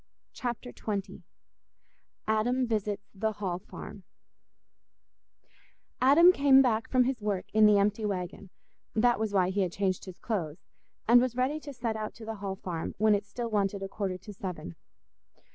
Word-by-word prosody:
Chapter 245 Hz, 0 st, -4 dB
XX 200 Hz, -3 st, -4 dB, 1.1 s
Adam 240 Hz, +4 st, +1 dB
Visits 210 Hz, -3 st, -2 dB
the 215 Hz, +2 st, -1 dB
Hall 190 Hz, -4 st, -3 dB
Farm 190 Hz, +1 st, -10 dB, 2.0 s
Adam 305 Hz, +8 st, +7 dB
came 275 Hz, -4 st, +6 dB
back 225 Hz, -3 st, 0 dB
from 255 Hz, -1 st, +4 dB
his 250 Hz, -2 st, -2 dB
work 205 Hz, -3 st, -1 dB
in 215 Hz, 0 st, +6 dB
the 210 Hz, -1 st, +5 dB
empty 205 Hz, +2 st, +1 dB
waggon—that 200 Hz, +4 st, -2 dB
was 220 Hz, -1 st, -1 dB
why 185 Hz, -2 st, +2 dB
he 200 Hz, +1 st, 0 dB
had 180 Hz, -3 st, 0 dB
changed 190 Hz, -1 st, -1 dB
his 185 Hz, -2 st, -9 dB
clothes—and 210 Hz, +5 st, 0 dB
was 250 Hz, -1 st, -1 dB
ready 260 Hz, +5 st, 0 dB
to 290 Hz, -1 st, -8 dB
set 235 Hz, -4 st, -3 dB
out 215 Hz, -1 st, -5 dB
to 225 Hz, -, -10 dB
the 220 Hz, 0 st, -5 dB
Hall 195 Hz, -1 st, -4 dB
Farm 175 Hz, -4 st, -5 dB
when 215 Hz, +1 st, +4 dB
it 205 Hz, 0 st, -1 dB
still 230 Hz, +2 st, -5 dB
wanted 200 Hz, -1 st, 0 dB
a -, -, -3 dB
quarter 195 Hz, -2 st, -3 dB
to 210 Hz, +3 st, -11 dB
seven. 180 Hz, -, -6 dB
210 Hz, 160 wpm, -29 LUFS, 195-240 Hz, 2.0 s, Adam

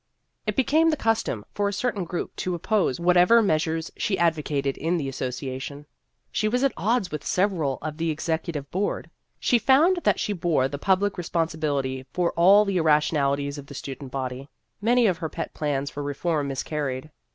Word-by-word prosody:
It -, -, 0 dB
became 310 Hz, +5 st, +3 dB
the 310 Hz, -, +1 dB
custom 220 Hz, -, 0 dB
for 205 Hz, 0 st, 0 dB
a -, -, -3 dB
certain 205 Hz, -2 st, -1 dB
group 175 Hz, +1 st, -4 dB
to 180 Hz, -1 st, -2 dB
oppose 185 Hz, -, 0 dB
whatever 180 Hz, +6 st, +5 dB
meas 155 Hz, -6 st, +2 dB
ures 160 Hz, 0 st, -3 dB
she 195 Hz, -, -1 dB
advocated 150 Hz, -5 st, 0 dB
in 165 Hz, +3 st, 0 dB
the 145 Hz, -4 st, -2 dB
Association. 135 Hz, +2 st, -5 dB, 0.5 s
She 215 Hz, -, 0 dB
was 250 Hz, +4 st, +1 dB
at 275 Hz, -, +2 dB
odds 215 Hz, -2 st, 0 dB
with 150 Hz, -, -4 dB
several 175 Hz, -9 st, 0 dB
on 155 Hz, -1 st, -4 dB
the 165 Hz, 0 st, -1 dB
Ex 155 Hz, 0 st, -3 dB
ecutive 160 Hz, -3 st, -2 dB
Board. 195 Hz, +3 st, -2 dB, 0.3 s
She 245 Hz, -, +3 dB
found 285 Hz, -, +4 dB
that 345 Hz, -, +1 dB
she 210 Hz, -, -1 dB
bore 170 Hz, -7 st, +1 dB
the 140 Hz, +1 st, -6 dB
public 195 Hz, +3 st, +1 dB
responsibility 155 Hz, -6 st, -1 dB
for 175 Hz, -1 st, +1 dB
all 195 Hz, +5 st, +6 dB
the 195 Hz, -2 st, 0 dB
irra 155 Hz, -3 st, +5 dB
tionalities 140 Hz, -1 st, -1 dB
of 140 Hz, -, -11 dB
the 140 Hz, -, -10 dB
student 135 Hz, 0 st, -7 dB
body. 130 Hz, +1 st, -4 dB, 0.3 s
Many 240 Hz, +3 st, +4 dB
of 180 Hz, -6 st, +2 dB
her 160 Hz, -, -3 dB
pet 165 Hz, -, -5 dB
plans 145 Hz, -2 st, -2 dB
for 145 Hz, -, -5 dB
reform 145 Hz, +1 st, -1 dB
miscarried. 140 Hz, 0 st, -3 dB
160 Hz, 185 wpm, -25 LUFS, 140-200 Hz, 0.5 s, all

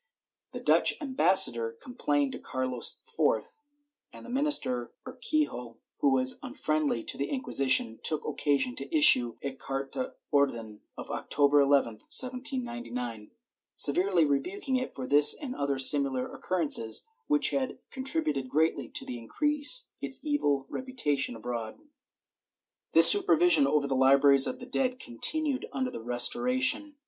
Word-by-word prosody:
The -, -, -7 dB
Dutch -, -, +2 dB
ambassador 185 Hz, -, +2 dB
complained 145 Hz, -, -3 dB
to -, -, -9 dB
Carlos 130 Hz, -2 st, -3 dB, 0.2 s
IV, -, -, -2 dB, 0.5 s
and -, -, -14 dB
the 245 Hz, -, -11 dB
minister 255 Hz, -, -2 dB
Urquijo, 250 Hz, -, -4 dB, 0.2 s
who 140 Hz, -, +1 dB
was 130 Hz, 0 st, +2 dB
unfriendly 155 Hz, -, -3 dB
to -, -, -3 dB
the 140 Hz, -, -4 dB
Inquisition, 135 Hz, -, +1 dB
took 155 Hz, -2 st, +1 dB
occasion 150 Hz, -, -2 dB
to 325 Hz, -, -4 dB
issue 125 Hz, -, +4 dB
a 140 Hz, -1 st, -5 dB
carta 135 Hz, -, -7 dB, 0.2 s
orden 115 Hz, -7 st, -2 dB, 0.2 s
of -, -, -9 dB
October 145 Hz, 0 st, 0 dB
11, 135 Hz, -6 st, 0 dB
1799, 240 Hz, -, -1 dB, 0.5 s
severely 180 Hz, +2 st, +3 dB
rebuking 265 Hz, -, -3 dB
it 255 Hz, 0 st, -5 dB
for 130 Hz, -, -7 dB
this 145 Hz, +2 st, +5 dB
and 275 Hz, -4 st, -8 dB
other 140 Hz, -1 st, -3 dB
similar 135 Hz, -1 st, +4 dB
occurrences, 150 Hz, -11 st, 0 dB, 0.2 s
which 295 Hz, -1 st, +2 dB
had 265 Hz, -2 st, -4 dB
contributed 260 Hz, -, -3 dB
greatly 160 Hz, +4 st, -2 dB
to -, -, -5 dB
increase 295 Hz, -, +1 dB
its -, -, -5 dB
evil 145 Hz, -, -2 dB
reputation 150 Hz, -, -3 dB
abroad.^ 115 Hz, 0 st, -7 dB, 1.2 s
This -, -, +10 dB
supervision 355 Hz, -7 st, +5 dB
over 150 Hz, -2 st, -1 dB
the 135 Hz, -1 st, -3 dB
libraries 135 Hz, +1 st, +5 dB
of 255 Hz, -, -5 dB
the 245 Hz, -, -11 dB
dead 255 Hz, 0 st, -3 dB
continued 275 Hz, -, -1 dB
under 260 Hz, -1 st, -4 dB
the -, -, -9 dB
Restoration. 255 Hz, -, +1 dB
150 Hz, 130 wpm, -27 LUFS, -, 1.2 s, This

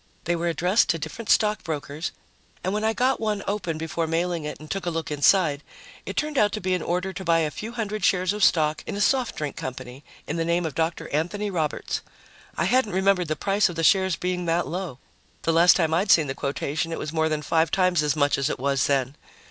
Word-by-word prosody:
They 175 Hz, 0 st, 0 dB
were 170 Hz, +1 st, -2 dB
addressed 180 Hz, +5 st, +2 dB
to 165 Hz, -, +2 dB
different 165 Hz, +9 st, -7 dB
stock 210 Hz, -1 st, +3 dB
brokers 150 Hz, 0 st, -4 dB, 0.5 s
and 185 Hz, -, -1 dB
when 210 Hz, +1 st, -1 dB
I 220 Hz, -, +3 dB
got 255 Hz, +4 st, +1 dB
one 210 Hz, -2 st, -1 dB
open 195 Hz, -6 st, -2 dB
before 165 Hz, +1 st, -2 dB
mailing 165 Hz, 0 st, -1 dB
it 150 Hz, -, -6 dB
and 155 Hz, -, -11 dB
took 195 Hz, +2 st, -4 dB
a -, -, +3 dB
look 165 Hz, -2 st, -4 dB
inside, 150 Hz, 0 st, +3 dB, 0.5 s
it -, -, -5 dB
turned 300 Hz, -2 st, 0 dB
out 205 Hz, -1 st, +4 dB
to 215 Hz, -, -2 dB
be 185 Hz, -1 st, -1 dB
an 180 Hz, -, 0 dB
order 180 Hz, +3 st, -2 dB
to 190 Hz, +1 st, -6 dB
buy 165 Hz, -2 st, +3 dB
a 155 Hz, -2 st, -1 dB
few 220 Hz, +9 st, -7 dB
hundred 215 Hz, -3 st, -3 dB
shares 185 Hz, +1 st, +2 dB
of 210 Hz, -1 st, -2 dB
stock 155 Hz, -4 st, +3 dB
in -, -, -4 dB
a -, -, -4 dB
soft 250 Hz, +3 st, +1 dB
drink 150 Hz, -2 st, -4 dB
company 130 Hz, +1 st, -7 dB, 0.2 s
in 155 Hz, -, -3 dB
the 165 Hz, -, 0 dB
name 170 Hz, +1 st, 0 dB
of 160 Hz, -, -3 dB
Dr. 165 Hz, +2 st, -2 dB
Anthony 200 Hz, +7 st, -2 dB
Roberts. 160 Hz, -5 st, -2 dB, 0.6 s
I -, -, +1 dB
hadn't 250 Hz, -6 st, +2 dB
remembered 190 Hz, -2 st, +2 dB
the 155 Hz, -, -1 dB
price 200 Hz, +3 st, +1 dB
of 175 Hz, -, -7 dB
the 165 Hz, -, -2 dB
shares 190 Hz, +1 st, +4 dB
being 180 Hz, 0 st, -2 dB
that 170 Hz, +1 st, +1 dB
low. 175 Hz, -6 st, -5 dB, 0.5 s
The 165 Hz, -, +1 dB
last 170 Hz, +2 st, +6 dB
time 160 Hz, -3 st, +1 dB
I'd 190 Hz, +5 st, +1 dB
seen 160 Hz, -6 st, +6 dB
the 135 Hz, -, -3 dB
quotation, 145 Hz, +4 st, -3 dB
it 165 Hz, -, -3 dB
was 155 Hz, +1 st, -5 dB
more 160 Hz, -1 st, +1 dB
than 155 Hz, -1 st, -2 dB
five 160 Hz, +3 st, +2 dB
times 185 Hz, -4 st, +2 dB
as 150 Hz, -1 st, +1 dB
much 145 Hz, -2 st, +2 dB
as 140 Hz, +2 st, 0 dB
it -, -, -2 dB
was 135 Hz, 0 st, +1 dB
then. 135 Hz, -1 st, 0 dB
170 Hz, 240 wpm, -25 LUFS, 155-195 Hz, 0.6 s, last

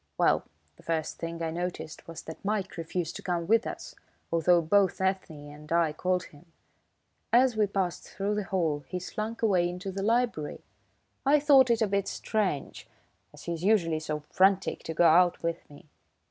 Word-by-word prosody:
Well, -, -, +3 dB, 0.3 s
the -, -, -17 dB
first 160 Hz, -1 st, -3 dB
thing 165 Hz, 0 st, -4 dB
I 160 Hz, -, -1 dB
noticed 175 Hz, -2 st, -5 dB
was 165 Hz, -1 st, -8 dB
that 160 Hz, -, -10 dB
Mike 200 Hz, -1 st, -2 dB
refused 165 Hz, 0 st, -3 dB
to -, -, -9 dB
come 175 Hz, -2 st, -2 dB
with 225 Hz, +5 st, +3 dB
us, -, -, -7 dB, 0.4 s
although 170 Hz, +1 st, +4 dB
both 185 Hz, +3 st, +2 dB
Ethne 185 Hz, -6 st, -2 dB
and 150 Hz, +1 st, -13 dB
I 165 Hz, -2 st, +2 dB
called 180 Hz, +3 st, 0 dB
him. 155 Hz, +2 st, -16 dB, 0.8 s
As 245 Hz, 0 st, +4 dB
we 215 Hz, -1 st, +2 dB
passed 190 Hz, -3 st, -2 dB
through 200 Hz, +1 st, -2 dB
the 210 Hz, 0 st, -1 dB
hall 160 Hz, -7 st, -1 dB
he 185 Hz, -, -4 dB
slunk 215 Hz, +5 st, -5 dB
away 180 Hz, -5 st, +3 dB
into 180 Hz, +2 st, -5 dB
the 195 Hz, +1 st, -4 dB
library. 225 Hz, -8 st, 0 dB, 0.6 s
I 290 Hz, +2 st, +4 dB
thought 275 Hz, -3 st, +6 dB
it 230 Hz, -1 st, +3 dB
a -, -, +2 dB
bit 200 Hz, 0 st, 0 dB
strange, 195 Hz, -10 st, -2 dB, 0.4 s
as -, -, -14 dB
he's 170 Hz, -1 st, -4 dB
usually 175 Hz, -6 st, +2 dB
so 155 Hz, -1 st, -4 dB
frantic 190 Hz, 0 st, +2 dB
to 160 Hz, -, -4 dB
go 175 Hz, -, +4 dB
out 175 Hz, +2 st, +4 dB
with 170 Hz, 0 st, -3 dB
me. 145 Hz, +1 st, -15 dB
180 Hz, 180 wpm, -28 LUFS, 165-205 Hz, 0.8 s, thought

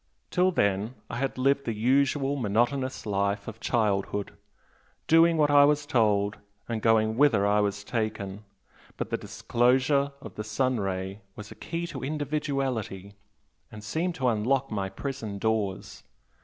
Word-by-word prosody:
Till 180 Hz, +1 st, +3 dB
then 100 Hz, -, 0 dB, 0.2 s
I 115 Hz, -, -4 dB
had 135 Hz, +1 st, -2 dB
lived 140 Hz, +2 st, +2 dB
the 115 Hz, -, -2 dB
usual 135 Hz, +4 st, +2 dB
monotonous 130 Hz, +3 st, 0 dB
life 100 Hz, 0 st, -1 dB
of 115 Hz, 0 st, -7 dB
childhood, 105 Hz, -3 st, -1 dB, 0.7 s
doing 165 Hz, +1 st, +5 dB
what 150 Hz, -1 st, +3 dB
I 145 Hz, 0 st, +7 dB
was 145 Hz, 0 st, +3 dB
told, 105 Hz, -6 st, +2 dB, 0.3 s
and 115 Hz, -2 st, -3 dB
going 110 Hz, 0 st, +3 dB
whither 125 Hz, -8 st, +4 dB
I 105 Hz, +1 st, +3 dB
was 105 Hz, 0 st, -1 dB
taken, 105 Hz, -3 st, -3 dB, 0.5 s
but -, -, -4 dB
the -, -, +1 dB
disclosure 130 Hz, +4 st, +1 dB
of -, -, -10 dB
the 105 Hz, -, -5 dB
sun 125 Hz, +3 st, 0 dB
ray 95 Hz, +1 st, -3 dB
was 105 Hz, 0 st, -9 dB
a -, -, -9 dB
key 170 Hz, 0 st, -4 dB
to 150 Hz, -7 st, -7 dB
individuality, 135 Hz, -9 st, -3 dB, 0.6 s
and 105 Hz, -1 st, -10 dB
seemed 165 Hz, +11 st, -2 dB
to 130 Hz, -, 0 dB
unlock 125 Hz, +4 st, +1 dB
my 100 Hz, -2 st, -2 dB
prison 110 Hz, -1 st, -5 dB
doors. 105 Hz, -2 st, -2 dB
115 Hz, 150 wpm, -27 LUFS, 105-140 Hz, 0.7 s, I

